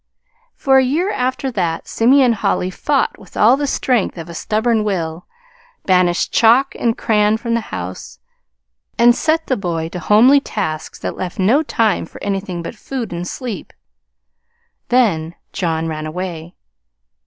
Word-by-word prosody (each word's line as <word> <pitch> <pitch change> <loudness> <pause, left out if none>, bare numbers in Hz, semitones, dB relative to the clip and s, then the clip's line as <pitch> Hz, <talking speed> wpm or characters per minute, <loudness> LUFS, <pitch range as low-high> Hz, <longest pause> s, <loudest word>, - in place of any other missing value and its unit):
For 270 -2 +4
a - - +3
year 325 +10 0
after 260 -3 -2
that 175 -7 -2
Simeon 250 +1 +4
Holly 195 -3 -1
fought 280 +8 -1
with 190 - -14
all 230 +5 +6
the 285 +1 -2
strength 245 -8 0
of 165 0 -8
a - - -7
stubborn 220 +5 0
will, 170 -5 -3 0.6
banished 180 -2 +2
chalk 240 +4 +4
and 230 -1 -1
crayon 210 -1 +2
from 230 +1 -3
the 230 - +2
house, 90 0 -7 0.8
and 240 0 +6
set 320 +3 0
the 260 - 0
boy 170 -6 -3
to 180 - -6
homely 230 - +5
tasks 155 - -4
that - - -5
left 180 -2 -5
no 220 +10 +3
time 225 -8 0
for - - -13
anything 195 -3 -3
but 170 - -6
food 235 -2 -6
and 175 +1 -4
sleep 235 -6 -6 1.2
then 175 -10 +1 0.2
John 165 -3 -1
ran 155 -1 -4
away. 170 0 -6
210 Hz, 155 wpm, -18 LUFS, 175-250 Hz, 1.2 s, all